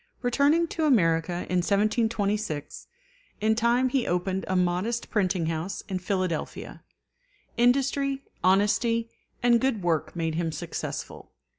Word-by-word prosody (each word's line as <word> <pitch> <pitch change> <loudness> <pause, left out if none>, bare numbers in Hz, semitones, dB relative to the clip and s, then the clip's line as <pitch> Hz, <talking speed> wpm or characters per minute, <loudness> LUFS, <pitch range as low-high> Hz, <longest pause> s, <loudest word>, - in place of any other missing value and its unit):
Returning 285 +7 +3
to 320 - -1
America 175 - +2
in 180 - 0
1726, 205 - -1 0.5
in 220 +1 +2
time 235 +3 +2
he 255 -1 0
opened 185 +2 -1
a 185 - -1
modest 180 +6 0
printing 185 -5 +1
house 165 +4 -3
in 185 -1 -3
Philadelphia. 185 -3 -3 0.7
Industry, 275 +3 +2 0.2
honesty, 225 +5 +2 0.3
and 240 -1 +4
good 255 -7 0
work 165 -1 0
made 165 -2 -1
him 165 0 -1
successful. - - -6
205 Hz, 120 wpm, -26 LUFS, 175-240 Hz, 0.7 s, and